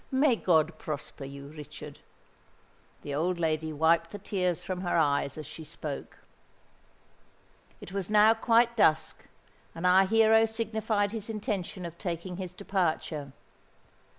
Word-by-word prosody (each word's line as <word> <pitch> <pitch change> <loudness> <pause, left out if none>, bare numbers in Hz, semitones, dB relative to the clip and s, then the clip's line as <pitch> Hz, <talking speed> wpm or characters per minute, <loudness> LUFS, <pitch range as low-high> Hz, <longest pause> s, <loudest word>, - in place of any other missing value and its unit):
"May 265 -1 +3
God 160 -5 +2
prosper 145 -2 -6
you, 140 +1 -9
Richard." 150 -1 -10 1.0
The 145 - -5
old 170 +4 0
lady 160 -1 0
wiped 165 +2 +2
the 205 - -7
tears 185 -4 -1
from 185 -1 -4
her 175 -2 0
eyes 145 -2 +1
as 155 - -6
she 155 +2 -9
spoke. 150 -2 -6 1.6
It - - -10
was 195 -1 -3
now 215 +1 +6
quite 235 +1 +3
dusk; 160 -8 +2 0.5
and 165 +2 -4
our 185 +1 +6
hero 225 +1 +5
signified 220 -2 -1
his 220 -1 -5
intention 205 -4 -3
of 170 0 -8
taking 175 -1 -4
his 185 -2 -5
departure. 165 -7 -2
180 Hz, 135 wpm, -29 LUFS, 155-210 Hz, 1.6 s, now